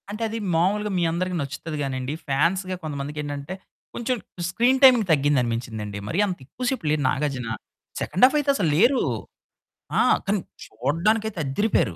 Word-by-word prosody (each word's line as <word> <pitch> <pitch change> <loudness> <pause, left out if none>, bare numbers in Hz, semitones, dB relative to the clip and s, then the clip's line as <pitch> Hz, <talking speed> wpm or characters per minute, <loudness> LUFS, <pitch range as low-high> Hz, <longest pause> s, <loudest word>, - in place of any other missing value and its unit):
అంటే, 210 +2 -6
అది 225 - -4 0.2
మామూలుగా 205 +5 +1
మీ - - +1
అందరికి 180 +2 -2
నచ్చుతది 155 +2 -5
గానండి, 130 0 -3
ఫాన్స్‌గా 185 +7 +1
కొంతమందికి 145 0 -5
ఏంటంటే, 145 +3 -5 0.4
కొంచెం 245 +1 -1 0.3
స్క్రీన్ 245 +8 +2
టైమింగ్ 245 -6 +7
తగ్గింది 145 -2 +3
అనిపించిందండి. 115 -3 -4
మరి 170 - -1
అంత 185 -3 -3
ఎక్కువ 250 - -6
సేపు 265 - -3
లేరు 150 -1 +1
నాగార్జున. 135 -4 -2 0.5
సెకండ్ 185 - -1
హాఫ్ 270 - +3
అయితే, 290 -1 -1
అసలు 180 - +1
లేరు. 245 +8 +4 1.0
ఆ! - - +6 0.2
కానీ 200 +1 +1 0.3
చూడడానికైతే 180 - 0
అద్దిరిపోయారు. 135 - +1
165 Hz, 150 wpm, -24 LUFS, 140-210 Hz, 1.0 s, టైమింగ్